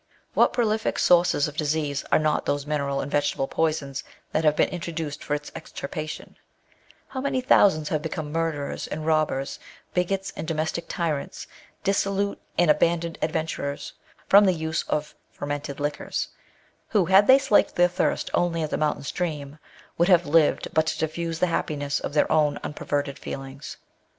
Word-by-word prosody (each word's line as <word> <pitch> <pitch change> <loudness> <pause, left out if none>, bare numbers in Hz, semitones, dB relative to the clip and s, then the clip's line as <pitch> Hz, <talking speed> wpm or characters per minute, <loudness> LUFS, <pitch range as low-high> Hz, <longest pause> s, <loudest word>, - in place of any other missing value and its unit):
What - - +4
|Âŧx)lifiG 220 -2 0
sources 175 -4 +4
of 150 - -8
disease 150 -2 -1
are - - +6
not 155 -1 0
those 145 0 0
mineral 140 -2 -1
and 140 - -5
vegetable 145 -2 0
poisons 150 -4 -1 0.3
that 155 - 0
have 150 -1 +4
been - - +3
introduced 165 -4 -5
for 150 - -1
its 145 0 -7
extirpation 155 +2 -6
'i - - -29
How 260 - -2
many 275 -1 0
thousands 190 - +4
have 155 -2 0
become 155 -1 -4
murderers 160 -3 -2
and 155 +1 -5
robbers, 155 -4 0 0.3
bigots 195 +2 -1
and 155 - -5
domestic 160 +1 -2
tyrants, 155 -5 -3 0.4
dissolute 200 0 0 0.2
and 175 -3 +5
abandoned 170 +1 +1
adventurers, 155 -2 -2 0.3
from 205 +1 +7
the 185 - +4
use 160 -1 -1
of 150 0 -1 0.2
fermented 145 0 -5
liquors; 145 0 -2 0.6
who 205 -5 +2
had 190 +4 +5
they 265 - +9
slaked 270 -6 +3
their 175 0 +5
thirst 180 - -1
only 165 -2 +1
at 155 - -3
the - - 0
mountain 150 -2 0
stream, 150 -2 -4 0.4
would 170 - +4
have 175 -2 +5
lived 150 +1 +3
but 160 0 +2
to - - -1
diffuse 165 +1 -2
the 180 - +2
happiness 145 -4 -1
of 145 - -5
their 150 - +3
own 150 -2 +3
unperverted 145 -1 -2
feelii^s. 135 0 -7
155 Hz, 165 wpm, -25 LUFS, 145-175 Hz, 0.6 s, they